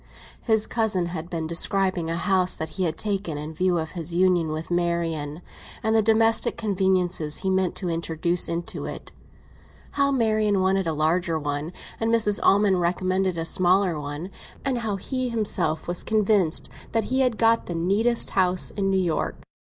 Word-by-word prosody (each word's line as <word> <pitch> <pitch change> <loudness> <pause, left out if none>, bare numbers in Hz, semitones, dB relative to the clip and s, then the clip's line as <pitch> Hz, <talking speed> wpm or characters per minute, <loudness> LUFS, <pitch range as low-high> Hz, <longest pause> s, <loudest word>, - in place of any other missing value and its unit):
His 220 -2 +2
cousin 220 -6 +1
had 170 -1 -6
been 165 -2 -3
describing 180 +1 0
a 165 - -1
house 185 +1 +1
that 160 - -4
he 185 +1 -2
had 160 -1 -2
taken 195 -7 -2
in 150 +2 -6
view 180 +2 +1
of 160 -1 -3
his 170 -1 -5
union 180 -2 +3
with 155 +2 -5
Marian, 170 -3 -1 0.4
and 220 0 +1
the 220 - +5
domestic 225 +1 +2
conveniences 185 -6 0
he 190 - +2
meant 190 -1 +1
to 185 - -3
introduce 170 +1 0
into 170 0 -4
it; - - -7 0.8
how 280 -1 +2
Marian 215 -5 +2
wanted 190 -1 +1
a 160 - 0
larger 165 +2 +1
one, 145 +1 -3 0.3
and 225 - 0
Mrs. 215 -3 +2
Almond 195 -2 +4
recommended 185 +1 0
a 165 - -2
smaller 180 -1 +2
one, 145 +6 -6 0.3
and 260 -3 0
how 220 -3 -2
he 255 +6 -3
himself 195 -8 0
was 175 0 -1
convinced 210 -6 +1 0.3
that 225 -1 +2
he 260 - +2
had 250 -4 +2
got 230 0 +3
the 175 - -3
neatest 205 +8 +1
house 185 -1 +2
in 195 -2 -1
New 190 - +2
York. 175 -4 -1
185 Hz, 175 wpm, -24 LUFS, 165-210 Hz, 0.8 s, the